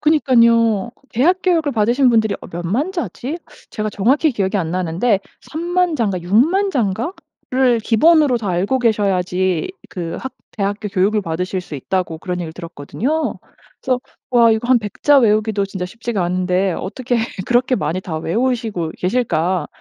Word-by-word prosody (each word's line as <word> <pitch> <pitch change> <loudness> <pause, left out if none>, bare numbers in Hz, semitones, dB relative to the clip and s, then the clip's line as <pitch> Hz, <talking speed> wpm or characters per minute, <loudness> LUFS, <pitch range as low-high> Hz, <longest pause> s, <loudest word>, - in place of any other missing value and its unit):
그니깐요. 235 -7 +3 0.2
대학 295 +10 +3
교육을 330 -5 +2
받으신 240 +4 +3
분들이 220 -2 +2
어 - - -10
몇 175 0 -5
만 260 - 0
자지? 330 -4 -4 0.3
제가 215 0 -3
정확히 270 +10 +2
기억이 200 -3 -1
안 170 -5 -1
나는데 185 +4 0 0.2
30,000 350 +2 -1
자인가? 200 -8 0
60,000 290 - +2
자인가?를 250 - -1
기본으로 285 +4 +4
다 210 -4 -4
알고 190 +9 +1
계셔야지 190 - +1 0.2
그 170 -2 -5
학 265 - -6 0.3
대학교 205 +1 -1
교육을 205 +2 +1
받으실 180 +3 -2
수 155 - -9
있다고 170 +3 -2
그런 180 +1 -4
얘기를 165 -2 -5
들었거든요. 180 - -3 0.4
그래서 255 -2 0 0.3
'와, 235 -2 +5
이거 220 +2 -2
한 255 -1 +6
100 210 -3 -8
자 290 -1 +6
외우기도 215 -3 +2
진짜 190 -2 -5
쉽지가 225 -1 -3
않은데 180 +1 0
어떻게 245 +8 -3 0.3
그렇게 250 +1 +2
많이 160 +2 -2
다 160 -4 -4
외우시고 220 -2 -1
계실까?' 185 -4 0
215 Hz, 335 characters per minute, -19 LUFS, 185-255 Hz, 0.4 s, 한